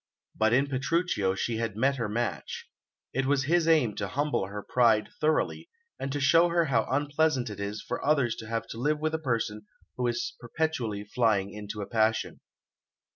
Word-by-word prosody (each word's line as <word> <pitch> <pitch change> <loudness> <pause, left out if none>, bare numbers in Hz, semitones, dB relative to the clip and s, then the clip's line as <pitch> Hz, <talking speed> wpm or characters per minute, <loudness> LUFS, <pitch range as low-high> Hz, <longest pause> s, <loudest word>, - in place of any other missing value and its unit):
But 110 0 +2
in 130 +4 +4
Petruchio 135 - 0
she 115 +3 -1
had 115 -2 -2
met 135 +4 +2
her 115 -4 -2
match. 115 +1 -3 0.5
It 135 0 0
was 140 -1 +2
his 165 +3 +2
aim 150 -10 +4
to 100 - -2
humble 140 -5 -1
her 100 +1 -6
pride 115 -4 +3
thoroughly, 155 - 0 0.3
and 135 - -3
to 145 - -2
show 165 +5 +5
her 170 0 +2
how 120 -6 +1
unpleasant 145 -3 +1
it 105 - -8
is 100 +1 -4
for - - -3
others 140 -6 +2
to 110 - -8
have 115 0 -2
to 115 - -7
live 150 +4 +1
with 155 +1 -1
a 160 - 0
person 110 -7 -2 0.3
who 125 -1 0
is 120 0 -2
perpetually 120 -6 -2
flying 105 -3 +1
into 105 0 -6
a - - -5
passion. 110 0 +1
120 Hz, 185 wpm, -28 LUFS, 110-145 Hz, 0.5 s, show